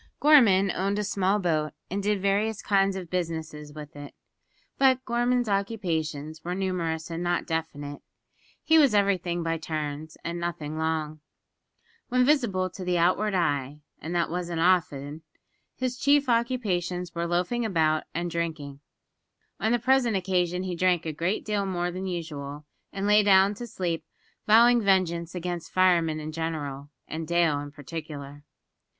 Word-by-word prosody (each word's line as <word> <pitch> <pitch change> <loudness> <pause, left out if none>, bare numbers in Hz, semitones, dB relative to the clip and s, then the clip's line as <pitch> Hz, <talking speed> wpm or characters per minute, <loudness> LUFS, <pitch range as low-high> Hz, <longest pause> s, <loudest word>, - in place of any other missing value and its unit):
Gorman 215 -11 +6
owned 195 +3 -1
a 210 - 0
small 195 0 +1
boat, 155 -6 0 0.2
and 200 +2 -1
did 205 0 0
various 205 +2 +1
kinds 195 -1 +2
of 180 -3 -7
business 165 -3 -2 0.2
with 150 -1 -9
it. 145 -1 -10 0.6
But 260 -1 +4
Gorman's 240 0 +1
occupations 160 -7 -2
were 180 +1 -3
numerous 170 -4 -2
and 165 +1 -4
not 175 0 0
definite. 145 -3 -4 0.6
He 320 0 +5
was 275 -8 +5
everything 185 -4 +1
by 165 0 -1
turns, 155 0 -5
and 170 +1 -4
nothing 160 -3 -4
long. 155 -1 -2 0.9
When 250 0 +3
visible 235 -11 +2
to 185 - -8
the 180 -1 0
outward 190 +4 +2
eye 145 -4 -1 0.2
(and 165 +3 -5
that 170 -1 +1
wasn't 175 -1 -3
often), 160 -4 +1 0.5
his 255 -1 -3
chief 285 +1 +3
occupations 195 -8 0
were 170 0 -2
loafing 180 +8 0
about 160 -7 +1
and 170 +1 -3
drinking. 155 -5 -4 0.8
On 220 - +1
the 240 - +4
present 245 -3 +2
occasion 180 -1 0
he 185 -2 -3
drank 175 -1 +2
a 160 - -3
good 170 +7 -1
deal 205 -2 -1
more 175 -1 -1
than 185 +2 -5
usual, 150 -5 -5 0.3
and 195 0 -3
lay 210 +1 +6
down 195 0 +5
to 240 +4 -7
sleep, 170 -6 -3 0.4
vowing 235 +2 +6
vengeance 180 -4 +1
against 175 -1 -4
firemen 170 -4 +3
in 155 0 -5
general, 150 -3 -4 0.2
and 160 0 -5
Dale 170 -4 +2
in 145 0 -6
particular. 145 -1 -8
175 Hz, 155 wpm, -27 LUFS, 160-200 Hz, 0.9 s, Gorman